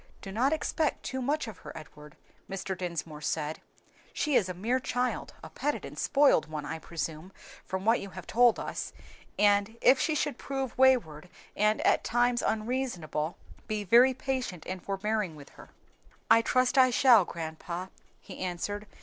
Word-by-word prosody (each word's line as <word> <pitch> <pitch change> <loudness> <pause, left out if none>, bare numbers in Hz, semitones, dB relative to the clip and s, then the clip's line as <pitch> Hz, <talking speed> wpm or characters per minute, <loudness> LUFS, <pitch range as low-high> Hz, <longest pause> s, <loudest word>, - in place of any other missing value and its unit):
"Do 195 - -7
not 245 +7 +2
expect 315 0 -1
too 260 0 -4
much 290 +2 -1
of 205 -6 -9
her, - - -9
Edward," 150 -1 -13 0.3
Mr. 195 0 -4
Dinsmore 170 -4 -5
said. 155 +1 -2 0.5
"She 300 - -1
is 185 -6 +3
a 180 - -4
mere 230 +8 0
child, 250 0 -2
a - - -8
petted 295 +1 -2
and - - -9
spoiled 280 - +3
one, 150 -2 -5
I 160 - -5
presume, 160 +2 -5 0.4
from 190 +1 -4
what 225 +2 +4
you 200 - -7
have 185 -2 -9
told 240 0 +4
us, - - -5 0.4
and 205 +2 +3
if 260 +1 +5
she 310 - +1
should 290 -1 -1
prove 270 -2 -4
wayward 185 - +3 0.3
and 210 +1 +2
at - - +3
times 240 +1 +2
unreasonable, 215 - -2 0.3
be 215 -1 -2
very 245 +6 +6
patient 255 - -3
and 185 -1 -5
forbearing 200 -2 -2
with 145 -2 -13
her." - - -15 0.6
"I 230 - +8
trust 255 +3 +2
I 255 -1 +7
shall, 245 -4 +6
grandpa," 170 +2 -6 0.3
he - - -11
answered. 195 +3 -4
210 Hz, 165 wpm, -29 LUFS, 175-255 Hz, 0.6 s, I